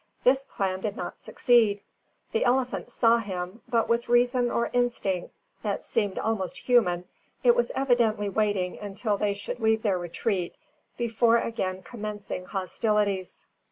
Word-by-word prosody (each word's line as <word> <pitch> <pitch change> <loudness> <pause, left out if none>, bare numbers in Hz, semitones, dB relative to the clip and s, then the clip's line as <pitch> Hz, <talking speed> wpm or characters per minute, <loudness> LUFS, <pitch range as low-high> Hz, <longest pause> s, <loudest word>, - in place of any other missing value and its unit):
This 265 +2 +4
plan 190 -5 -2
did 210 -1 -3
not - - -5
succeed. 220 -5 +3 0.5
The 455 - +1
elephant 255 0 0
saw 230 0 +4
him, 190 0 -5
but 230 -2 +2
with 235 0 0
reason 245 0 +3
or 235 - 0
instinct 240 -7 0 0.3
that 205 -2 -2
seemed 205 -4 -1
almost 220 -4 -1
human, 180 -8 +2 0.4
it 480 -1 +6
was 485 0 +1
evidently 235 -6 +2
waiting 200 -3 0
until 205 +1 -2
they 200 0 0
should 205 - -6
leave 220 -1 +2
their 195 -5 +1
retreat 175 +1 -2 0.4
before 235 0 +3
again 190 -5 -2
commencing 205 -2 -6
hostilities. 200 0 -1
215 Hz, 140 wpm, -27 LUFS, 195-240 Hz, 0.5 s, it